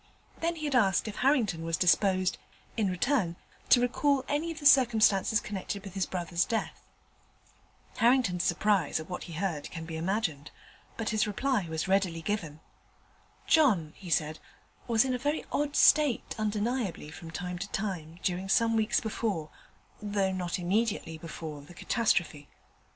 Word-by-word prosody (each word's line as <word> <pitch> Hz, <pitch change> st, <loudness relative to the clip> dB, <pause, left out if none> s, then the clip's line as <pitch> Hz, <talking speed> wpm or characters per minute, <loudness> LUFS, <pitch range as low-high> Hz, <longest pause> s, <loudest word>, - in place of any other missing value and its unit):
Then 335 Hz, +1 st, -1 dB
he 310 Hz, -2 st, -5 dB
had 290 Hz, -, -1 dB
asked 205 Hz, -5 st, +3 dB
if 210 Hz, -, -6 dB
Harrington 235 Hz, -, +1 dB
was 165 Hz, 0 st, -1 dB
disposed, 185 Hz, +1 st, +2 dB, 0.4 s
in 215 Hz, -4 st, +1 dB
return, 185 Hz, -1 st, 0 dB, 0.3 s
to 245 Hz, -, +7 dB
recall 265 Hz, +2 st, +1 dB
any 295 Hz, +3 st, -1 dB
of 320 Hz, -, -8 dB
the 290 Hz, -, -10 dB
circumstances 225 Hz, -6 st, +5 dB
connected 200 Hz, -1 st, -5 dB
with 195 Hz, -3 st, -9 dB
his 195 Hz, -2 st, -1 dB
brother's 175 Hz, -1 st, -1 dB
death. 225 Hz, +2 st, -3 dB, 1.2 s
Harrington's 230 Hz, -8 st, +3 dB
surprise 195 Hz, -3 st, +1 dB
at 155 Hz, -, -8 dB
what 180 Hz, -, -5 dB
he 170 Hz, -, -9 dB
heard 165 Hz, -3 st, -3 dB
can 165 Hz, -1 st, -7 dB
be 160 Hz, 0 st, -6 dB
imagined: 165 Hz, -5 st, -2 dB, 0.5 s
but 225 Hz, -, -2 dB
his 215 Hz, 0 st, +1 dB
reply 210 Hz, -2 st, 0 dB
was 160 Hz, +3 st, -2 dB
readily 190 Hz, -4 st, +1 dB
given. 160 Hz, -6 st, -3 dB, 0.8 s
'John,' 205 Hz, -, +3 dB
he 185 Hz, -, -10 dB
said, 155 Hz, -1 st, 0 dB, 0.5 s
'was 230 Hz, 0 st, +3 dB
in 260 Hz, -, 0 dB
a 250 Hz, -, -2 dB
very 290 Hz, +4 st, -1 dB
odd 290 Hz, 0 st, -1 dB
state, 295 Hz, -6 st, +4 dB
undeniably, 215 Hz, -, -2 dB
from 165 Hz, 0 st, -10 dB
time 180 Hz, +2 st, -5 dB
to 200 Hz, +2 st, -5 dB
time, 170 Hz, -6 st, -4 dB
during 185 Hz, +1 st, -2 dB
some 230 Hz, +3 st, +3 dB
weeks 220 Hz, -1 st, +2 dB
before, 210 Hz, -8 st, -3 dB, 0.5 s
though 200 Hz, -2 st, 0 dB
not 180 Hz, -1 st, -2 dB
immediately 185 Hz, -3 st, -1 dB
before, 155 Hz, -2 st, -7 dB
the 150 Hz, +5 st, -15 dB
catastrophe. 170 Hz, -, 0 dB
195 Hz, 155 wpm, -29 LUFS, 170-230 Hz, 1.2 s, to